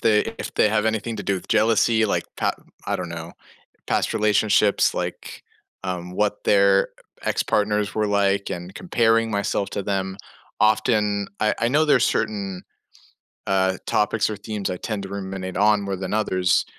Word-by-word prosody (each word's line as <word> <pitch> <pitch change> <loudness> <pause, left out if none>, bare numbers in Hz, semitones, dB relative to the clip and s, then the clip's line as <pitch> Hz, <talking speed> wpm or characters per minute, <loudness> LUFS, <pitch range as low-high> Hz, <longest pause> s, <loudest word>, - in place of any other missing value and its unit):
they 105 -2 +4 0.2
if - - -6
they 105 - +4
have 110 +1 +1
anything 110 +1 -1
to 100 - -5
do 100 - +1
with 95 - -7
jealousy, 110 +1 +3
like, - - 0
pa - - +1 0.3
I - - 0
don't 90 -2 -5
know, 85 0 -7 0.6
past - - 0
relationships, 105 -1 +3
like, - - -5 0.4
um, 90 -1 -4
what 105 +1 -1
their 100 -1 +4
uh, - - -12
ex-partners 105 0 0
were 105 -1 +1
like 100 -1 +1
and 90 +1 -6
comparing 115 -9 +2
myself 100 -1 -1
to 100 - -3
them, 95 -1 -2 0.4
often, 105 -2 +2
I 110 - +2
I 120 - +2
know 155 +4 +3
there's 135 -4 +4
certain, 100 -4 -2 0.8
uh, 95 -1 +2
topics 105 +1 +1
or 105 - -3
themes 105 -1 -4
I 90 - -3
tend 105 0 -4
to 95 - -7
ruminate 95 -2 -5
on 105 0 +4
more 100 -1 -2
than 95 +1 -4
others, 95 -4 +2
105 Hz, 170 wpm, -23 LUFS, 95-110 Hz, 0.8 s, they